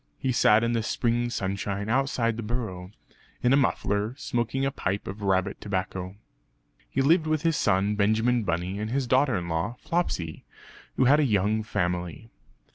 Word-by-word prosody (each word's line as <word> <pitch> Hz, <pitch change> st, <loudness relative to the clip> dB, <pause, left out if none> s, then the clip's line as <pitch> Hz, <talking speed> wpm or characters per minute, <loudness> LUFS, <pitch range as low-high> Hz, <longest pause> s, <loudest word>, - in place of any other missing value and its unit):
He 130 Hz, -3 st, -1 dB
sat 110 Hz, -2 st, +4 dB
in 115 Hz, 0 st, +1 dB
the 115 Hz, -, +1 dB
spring 120 Hz, +2 st, 0 dB
sunshine 100 Hz, -1 st, -3 dB
outside 120 Hz, -2 st, +1 dB
the 115 Hz, -, -4 dB
burrow, 105 Hz, -6 st, -4 dB, 0.5 s
in 125 Hz, +1 st, +4 dB
a -, -, +7 dB
muffler; 105 Hz, -4 st, 0 dB
smoking 120 Hz, +1 st, -1 dB
a 135 Hz, -, 0 dB
pipe 100 Hz, -7 st, -3 dB
of 100 Hz, +3 st, -7 dB
rabbit 95 Hz, 0 st, 0 dB
tobacco. 95 Hz, -1 st, -3 dB, 0.7 s
He 135 Hz, -, 0 dB
lived 160 Hz, +3 st, +4 dB
with 155 Hz, 0 st, 0 dB
his 165 Hz, -1 st, +2 dB
son 100 Hz, -2 st, +2 dB
Benjamin 110 Hz, +4 st, +2 dB
Bunny 90 Hz, 0 st, -2 dB
and 105 Hz, +1 st, -3 dB
his 135 Hz, +2 st, 0 dB
daughter 130 Hz, 0 st, +3 dB
in 90 Hz, -1 st, -4 dB
law 85 Hz, +7 st, -2 dB
Flopsy, 90 Hz, -, -2 dB, 0.5 s
who 130 Hz, -, +4 dB
had 145 Hz, +4 st, +5 dB
a -, -, +4 dB
young 105 Hz, -3 st, +1 dB
family. 90 Hz, 0 st, -3 dB
110 Hz, 170 wpm, -26 LUFS, 95-125 Hz, 0.7 s, a